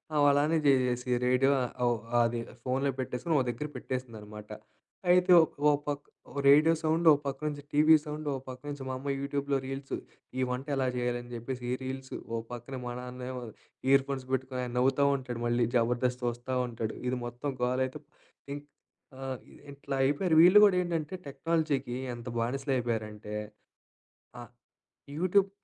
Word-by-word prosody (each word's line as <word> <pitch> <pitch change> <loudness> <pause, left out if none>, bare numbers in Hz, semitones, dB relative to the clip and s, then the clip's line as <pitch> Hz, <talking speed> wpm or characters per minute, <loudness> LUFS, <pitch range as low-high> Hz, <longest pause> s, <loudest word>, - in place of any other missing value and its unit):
ఆమలానే 145 +2 +4
చేసేసి 125 -2 +2 0.2
రేడియో 130 +2 +4
ఆహ్, 125 - -4
ఓహ్, 120 -2 +1 0.2
అది 115 0 0 0.2
ఫోన్‌లో 135 +2 +1
పెట్టేసుకొని 145 +5 -1
ఒక 130 - +1
దగ్గర 120 +6 -5
పెట్టేసిందన్నమాట. 110 -5 -6 0.6
అయితే 180 +1 +5
ఓ - - +7 0.3
ఓ - - +6 0.2
పక్క 145 0 -2 0.4
రేడియో 150 +4 +7
సౌండ్, 160 +1 +1
ఓ - - +9
పక్క 135 -1 -3
నుంచి 145 -1 -4
టీవీ 155 +2 +6
సౌండ్, 150 0 -6
ఓ - - -1
పక్క 125 0 -8
నుంచి 145 -2 -5
మా - - -2
అమ్మ 140 +2 -5
యూట్యూబ్‌లో 140 0 -1
రీల్స్ 135 +1 -4 0.4
ఈ - - +2
వంట 125 +3 -3
ఎలా 130 -1 +1
చేయాలి? 120 0 0
అని 120 - -13
చెప్పేసి 125 +2 -5
ఈ - - +1
రీల్స్. 130 0 -6 0.2
ఓ - - +1 0.2
పక్కన 120 +2 -7
మా 120 - -3
నాన్నేమో 125 0 -6 0.5
ఇయర్ 135 0 +5
ఫోన్స్ 130 -2 -3
పెట్టుకొని 130 -1 -1
నవ్వుతా 135 +3 +3
ఉంటాడు 125 -3 -5
మళ్ళీ. 120 0 +2
జబర్దస్త్ 125 +1 +1
చూస్తా 120 +2 -2
ఉంటాడు. 115 -2 -4
ఇది 125 +1 0
మొత్తం 120 +4 -4
గోలైతే 130 +3 0 0.5
ఇంక్ 145 0 -9 0.6
ఆహ్, 130 -1 -3
ఇది - - -16
ఇట్లా 140 0 -5
అయిపోయారు. 155 +5 +2
వీళ్ళు 180 +5 +8
గూడా 195 -3 +4
ఏంటంటే 165 -1 -2
టెక్నాలజీకి 140 -3 -1 0.2
ఎంత 120 +1 -10
బానిసలు 135 +4 -1
అయిపోయారంటే. 110 -3 -3 1.1
అ - - -7 0.8
యూట్యూబ్ 190 +3 +3
130 Hz, 155 wpm, -30 LUFS, 125-145 Hz, 1.1 s, ఓ